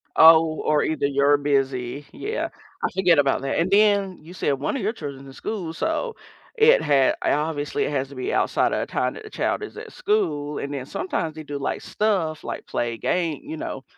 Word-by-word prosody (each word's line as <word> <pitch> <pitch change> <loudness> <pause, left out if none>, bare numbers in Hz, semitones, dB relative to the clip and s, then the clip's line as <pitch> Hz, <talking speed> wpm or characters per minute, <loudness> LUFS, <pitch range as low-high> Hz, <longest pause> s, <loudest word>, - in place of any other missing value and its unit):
Oh, 160 0 +7
or 150 -1 +2
either 155 -2 0
you're 140 +1 +3
busy? 135 -1 -1
Yeah, 435 +3 -3 0.3
I - - +3
forget 180 -5 +4
about 135 -2 +2
that, 135 0 -1
and 170 +3 +1
then, 200 -2 +3
you 165 +3 -12
said 145 -6 0
1 135 - -2
of 270 - -2
your 210 +3 0
children's 140 - -7
in 135 - -11
school, 175 +1 -4
so, 320 - -2 0.4
it 460 +2 +6
had 135 -2 +3
uh, - - +1
obviously, 150 -1 -1
it - - -1
has 135 -2 -1
to 140 - -11
be 130 - -3
outside - - +2
of - - 0
the - - -4
time - - 0
that - - -10
the 430 - -10
child - - -1
is 420 - -8
at - - -8
school, 155 - -1
and 140 +1 -4
then, 130 -2 -4
sometimes, 160 -1 -3
they 155 - -7
do, 145 -1 -5
like, 140 - -2
stuff, 185 -8 -1
like, - - -5
play 120 -1 -1
a - - -7
game 165 +2 -1
you 160 - -6
know, 135 -3 -5
155 Hz, 225 wpm, -24 LUFS, 140-190 Hz, 0.4 s, Oh